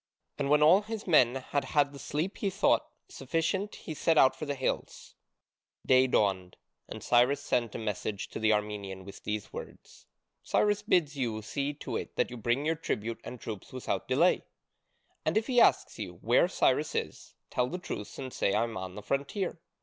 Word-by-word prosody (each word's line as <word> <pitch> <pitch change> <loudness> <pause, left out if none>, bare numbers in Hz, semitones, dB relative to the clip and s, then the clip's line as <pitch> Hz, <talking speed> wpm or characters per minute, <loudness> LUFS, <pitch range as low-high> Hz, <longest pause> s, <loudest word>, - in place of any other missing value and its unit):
And 140 -1 0
when 150 +1 +5
all 175 +6 +7
his 220 0 -6
men 130 -8 +5
had 135 +2 -2
had 145 -2 +1
the 140 - -10
sleep 160 +9 -3
he 200 - 0
thought 185 - +2 0.2
sufficient 165 +9 -2
he 160 - -7
set 160 +2 +1
out 130 -2 +6
for 155 - -6
the 145 - -1
hills. 130 - -3 0.7
Day 130 0 +5
dawned, 95 -6 0 0.3
and - - -7
Cyrus 125 +4 +4
sent 120 -5 -1
a - - -1
messenger 105 -2 -3
to - - -5
the 110 0 +3
Armenian 105 -3 -2
with 100 - -11
these 105 -1 -4
words: - - -10 0.3
"Cyrus 210 0 +1
bids 170 -9 +1
you 115 -5 -2
see 140 +6 -3
to - - -4
it - - -7
that - - 0
you 125 - -6
bring 120 +5 0
your 160 - +2
tribute 115 -8 -3
and 125 - -8
troops 105 -4 -7
without 130 -1 -3
delay." - - +3 0.8
"And 155 +6 +1
if 220 - +1
he 245 -2 +4
asks - - +3
you 95 -4 -5
where 120 +9 +4
Cyrus 150 -4 +1
is, - - -4 0.2
tell 125 - +1
the 180 - -4
truth 105 - -6
and 130 -2 -6
say 100 - +1
I 110 - +3
am 115 -1 -4
on 95 0 -6
the 105 - -8
frontier. 150 - -2
130 Hz, 195 wpm, -30 LUFS, 110-155 Hz, 0.8 s, all